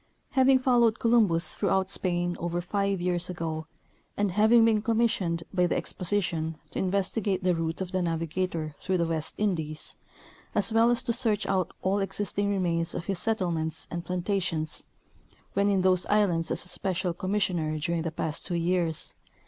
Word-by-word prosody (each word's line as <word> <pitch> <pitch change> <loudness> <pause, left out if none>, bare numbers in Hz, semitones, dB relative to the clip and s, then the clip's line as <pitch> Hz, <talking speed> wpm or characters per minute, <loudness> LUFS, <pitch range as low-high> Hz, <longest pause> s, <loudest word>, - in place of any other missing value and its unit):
Having 265 0 +5
followed 240 -3 +3
Columbus 215 -8 +3
throughout 190 0 +1
Spain 175 -1 +1
over 175 0 -2
five 195 +2 -1
years 175 0 0
ago, 160 -3 -4 0.5
and 205 -2 +1
having 220 +4 +5
been 220 -2 +3
commissioned 215 -7 +1
by 180 -2 +3
the - - 0
Exposition 170 -4 -1
to - - -2
inves 190 +1 0
tigate 195 -4 -1
the 180 -1 +3
route 165 +1 -2
of 185 -1 -4
the 185 -1 0
navigator 165 -1 -2
through 190 -1 0
the 170 - +1
West 160 -1 -3
Indies, 160 -7 -3 0.6
as 210 +2 +3
well 225 +1 +5
as 240 -1 +2
to 240 -2 0
search 220 -4 +1
out 185 -3 0
all 195 +2 +1
existing 200 0 -1
remains 170 -4 0
of 170 - -4
his 195 -3 -2
settlements 170 -8 -1
and 170 0 -4
plantations, 180 -3 -2 0.7
when 200 +1 +2
in 195 -2 +2
those 185 -1 +3
islands 185 -6 +2
as - - -1
a - - -10
special 185 -1 -1
commissioner 175 -4 -1
during 170 +2 -1
the 165 - -2
past 160 0 -2
two 175 - -1
years. 170 -1 -1
185 Hz, 170 wpm, -27 LUFS, 170-205 Hz, 0.7 s, Having